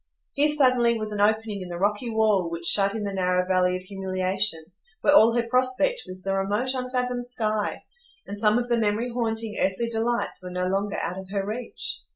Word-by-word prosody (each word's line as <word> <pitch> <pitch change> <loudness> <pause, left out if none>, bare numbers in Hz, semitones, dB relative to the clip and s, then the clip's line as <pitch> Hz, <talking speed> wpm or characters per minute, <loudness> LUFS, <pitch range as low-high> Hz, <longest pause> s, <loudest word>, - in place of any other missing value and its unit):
Here 295 +1 +2
suddenly 255 -5 +3
was 215 -1 -5
an 205 -1 -2
opening 215 -1 +1
in 180 - -7
the 175 - -5
rocky 205 +5 -1
wall 215 -5 +2
which 170 0 -5
shut 200 +3 +5
in 220 - -3
the 200 -1 -3
narrow 180 -1 +1
valley 185 -1 +2
of 185 - -11
humiliation, 185 -2 -2 0.4
where 295 - +4
all 230 -6 +7
her 235 -1 0
prospect 255 - +1
was 185 0 -9
the 195 0 -1
remote, 205 +7 -1
unfathomed 250 -1 -2
sky; 215 -4 -1 0.4
and 205 +1 -7
some 210 +1 +3
of 245 0 -1
the 235 -1 +1
memory 220 +3 0
haunting 225 -2 -2
earthly 195 +5 0
delights 230 -1 -2
were 180 - -7
no 180 0 -2
longer 195 +2 -1
out 180 +2 -3
of 190 -1 -10
her 195 -1 -2
reach. 230 +4 -5
210 Hz, 200 wpm, -25 LUFS, 190-240 Hz, 0.4 s, all